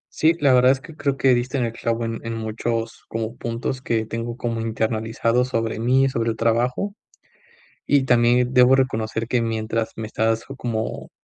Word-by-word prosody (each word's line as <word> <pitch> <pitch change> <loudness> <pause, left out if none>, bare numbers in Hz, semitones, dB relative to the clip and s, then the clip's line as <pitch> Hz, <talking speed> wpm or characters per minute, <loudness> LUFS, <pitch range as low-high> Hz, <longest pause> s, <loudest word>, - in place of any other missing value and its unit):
Sí, 160 +1 +4
la 140 -3 +4
verdad 125 +1 +6
es 135 - 0
que, 155 +3 -13
creo 140 -3 -1
que, 135 -2 +4
diste 125 +3 -2
en 125 - +1
el 115 - -4
clavo 115 0 -2
en 115 0 -5
en 115 - -3
muchos 115 +1 -3
como 115 +1 -3
puntos 120 +2 -4
que 115 -3 -1
tengo 115 +2 -5
como 115 -1 -2
internalizados 115 +2 0
sobre 115 -3 -1
mí 130 +4 +3
y - - +2
sobre 115 -2 -1
el 110 - -6
trabajo. 125 - 0 0.9
Y 145 -1 +4
también 125 0 +3
debo 125 +1 +6
reconocer 115 -3 -1
que 125 - +1
mientras 115 0 -2
me 110 - -4
estás 110 +1 0
como 115 -3 -4
115 Hz, 185 wpm, -22 LUFS, 115-125 Hz, 0.9 s, verdad